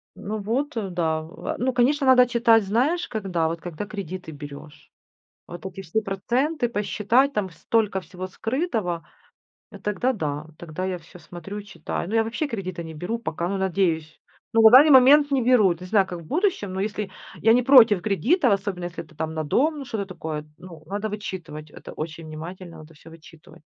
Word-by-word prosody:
Ну 215 +2 -5
вот, 250 +9 -2
э, 200 -4 -2
да, 160 -3 0
э. 160 +2 -6
Ну, 255 +1 0
конечно, 275 +4 +2
надо 255 -1 +7
читать 235 -2 +4
знаешь 260 - +1
когда, 185 -7 -1
вот 165 0 -4
когда 175 +3 -6
кредиты 185 -5 -7
берешь. 145 0 -11 0.6
Вот 175 +2 -10
эти 190 0 -7
все 190 +5 -1
проценты 240 +8 -1
посчитать, 230 +5 +1
там 205 -7 -2
столько 195 +4 0
всего 185 0 -8
скрытого, 225 - -2 0.7
э, 200 - -11
тогда 210 +6 0
да, 150 - -4
тогда 170 +2 -5
я 185 -1 -2
всё 175 +1 -15
смотрю 175 +5 -9
и - - -9
читаю. 190 -3 -5
Ну, 225 - -2
я 225 - +4
вообще 235 +7 -2
кредиты 185 -8 -5
не 160 -1 -8
беру 180 +9 -4
пока, 170 -6 -3
ну, 195 +1 -2
надеюсь. 170 -5 -1 0.3
Ну, 225 - +5
в 220 - +9
данный 280 +5 +9
момент 285 +2 +7
не 270 -2 +2
беру, 245 -4 +5
вот 175 -2 +1
не 185 - -7
знаю, 195 -1 +3
как 175 - -6
в - - -13
будущем, 335 - 0
но 190 - -3
если 210 0 -3 0.3
я 225 - +5
не 245 +2 +5
против 235 -7 +7
кредитов, 235 - +2
особенно 195 -3 -3
если 175 -1 -6
это 160 - -20
там 160 +1 -4
на 160 0 -2
дом, 295 - +1
ну, 275 - -7
что-то 215 -5 -3
такое, 155 -5 -6
ну, 170 -4 -12
надо 205 +3 -3
вычитывать, 175 -7 -7
это - - -11
очень 160 +1 -6
внимательно 165 +2 -8
надо 155 +1 -13
всё 160 +1 -16
вычитывать. 165 -1 -16
195 Hz, 195 wpm, -24 LUFS, 170-235 Hz, 0.7 s, в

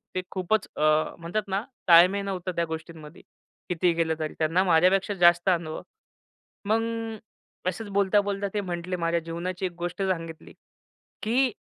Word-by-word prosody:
ते 185 - 0
खूपच 190 +3 0
अ, - - -4 0.4
म्हणतात 200 +5 -3
ना 195 +3 -1 0.2
ताळमेळ 180 +4 +6
नव्हतं 185 -1 -3
त्या 170 - +1
गोष्टींमध्ये 160 -1 -8 0.5
कितीही 175 0 +2
केलं 165 -1 +1
तरी 155 -1 -3
त्यांना 165 +4 +2
माझ्यापेक्षा 185 +4 +3
जास्त 175 0 +4
अनुभव. 165 -3 -1 0.8
मग 220 +2 +2 0.9
असंच 205 +4 -6
बोलता, 200 +1 +3
बोलता 200 0 -2
ते 205 - 0
म्हंटले 180 0 -4
माझ्या 170 -1 0
जीवनाची 175 +3 -4
एक 180 - -2
गोष्ट 175 +2 -4
सांगितली 165 -4 -4 0.7
की 250 +4 +2
180 Hz, 145 wpm, -26 LUFS, 170-195 Hz, 0.9 s, ताळमेळ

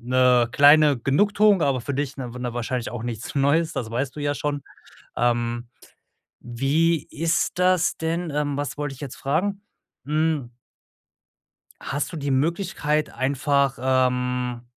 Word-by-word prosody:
'ne 125 0 +3
kleine 145 +1 +6
Genugtuung, 200 - +3
aber 135 -3 +1
für 140 +4 -4
dich 140 0 -3
'ne 125 -3 -6
w 125 - -8
'ne 125 -1 -4
wahrscheinlich 120 0 -3
auch 120 -2 -6
nichts 120 -2 -5
Neues, 150 +4 +2
das 110 -3 -4
weißt 130 +3 -2
du 150 - -7
ja 145 0 0
schon. 145 0 -3 0.5
Ähm, 120 0 0 0.7
wie 140 +7 0
ist 165 +3 -1
das 180 -2 +2
denn 165 +1 -2
ähm, 145 -1 -1
was 145 0 -4
wollte 145 -2 -4
ich - - -17
jetzt 140 -3 -6
fragen? 190 +9 -1 0.4
Hm 155 -3 0 1.3
Hast 145 +4 -3
du - - -6
die 145 -2 -3
Möglichkeit 155 +1 0
einfach, 140 0 0
ähm 125 -1 0
140 Hz, 145 wpm, -23 LUFS, 125-155 Hz, 1.3 s, kleine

